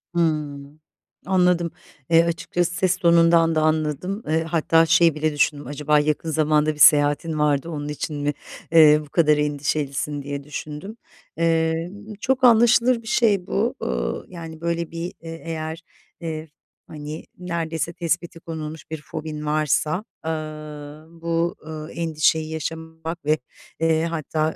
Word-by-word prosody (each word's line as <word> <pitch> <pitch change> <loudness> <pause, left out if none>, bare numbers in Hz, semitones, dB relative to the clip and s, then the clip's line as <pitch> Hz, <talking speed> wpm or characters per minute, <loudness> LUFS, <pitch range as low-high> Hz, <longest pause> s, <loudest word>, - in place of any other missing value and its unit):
Hımm, 150 -3 -1 0.5
anladım. 180 -2 +2 0.4
Eee, 165 0 +6
açıkçası 170 +1 -1
ses 185 0 +1
tonundan 170 -2 +4
da 155 - +3
anladım. 155 - 0
Eee, 160 +1 +1
hatta 165 0 +3
şey 165 0 +4
bile 155 0 0
düşündüm, 145 -2 0
"Acaba 150 +1 +2
yakın 155 +2 -1
zamanda 155 0 +2
bir 150 - -14
seyahatin 145 +2 +5
var 145 -2 +2
da 170 - -8
onun 145 -3 -4
için 150 +1 -4
mi, 145 0 -1 0.4
eee, 155 -2 +7
bu - - -19
kadar 150 -1 +3
endişelisin?" 145 0 -1
diye 140 0 -5
düşündüm. 150 +8 -7 0.4
Eee, 165 +1 +1 0.3
çok 265 +2 0
anlaşılır 240 0 +5
bir 225 - -14
şey 205 -5 +2
bu, - - 0
ııı, - - -2
yani, 165 -3 -9
böyle 170 -1 -2
bir 170 +1 -5
e 165 - -10
eğer, 165 0 -5 0.4
eee, 160 -1 -5 0.4
hani 150 +1 -7
neredeyse 170 -2 -3
tespiti 170 0 -2
konulmuş 160 -1 -7
bir 160 - -5
fobin 150 -1 -6
varsa, 155 +4 +1 0.2
ııı, 155 -1 -6
bu, 170 +1 0
ııı, 155 -1 -7
endişeyi 160 -1 +1
yaşamak 160 +1 -6
ve, 155 +1 +3 0.4
eee, 160 0 +2
hatta 155 -1 -1
160 Hz, 140 wpm, -23 LUFS, 150-170 Hz, 0.5 s, eee